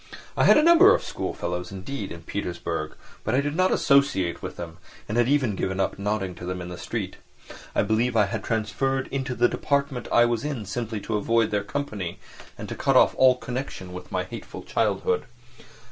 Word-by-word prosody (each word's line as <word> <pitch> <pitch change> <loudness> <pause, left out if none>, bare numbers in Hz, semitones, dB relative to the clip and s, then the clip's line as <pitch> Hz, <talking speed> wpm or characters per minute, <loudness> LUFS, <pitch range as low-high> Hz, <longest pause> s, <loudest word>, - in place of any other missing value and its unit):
I - - +3
had - - +7
a 300 - +5
number 340 +4 +8
of - - -3
schoolfellows, 90 +1 -4
indeed, 100 +3 -5
in 85 -1 -8
Petersburg, 90 -1 -4 0.3
but 110 - 0
I - - +4
did 145 +1 -2
not 185 +2 +3
associate 140 -12 +2
with - - -6
them 85 0 -8 0.3
and 105 - -3
had 120 +1 +3
even 135 -8 +2
given 95 0 -2
up 95 - -1
nodding 100 -2 -1
to 90 - -7
them 90 0 -3
in 90 0 -6
the 90 - -7
street. - - -4 0.6
I - - +3
believe 115 +3 +1
I 105 -2 +5
had 100 - -4
transferred 130 +5 -1
into 130 -2 -3
the 120 0 +4
department 140 -3 -1
I 120 - +6
was 120 0 0
in 140 -8 -3
simply 110 +1 -4
to 110 +1 -1
avoid 115 +1 +2
their 105 -1 0
company 100 -8 -4 0.4
and - - -7
to - - -5
cut - - +1
off - - +6
all 130 -1 +6
connection 125 -8 -5
with 90 0 -9
my - - 0
hateful - - -8
childhood. 90 - 0
110 Hz, 200 wpm, -25 LUFS, 95-135 Hz, 0.6 s, number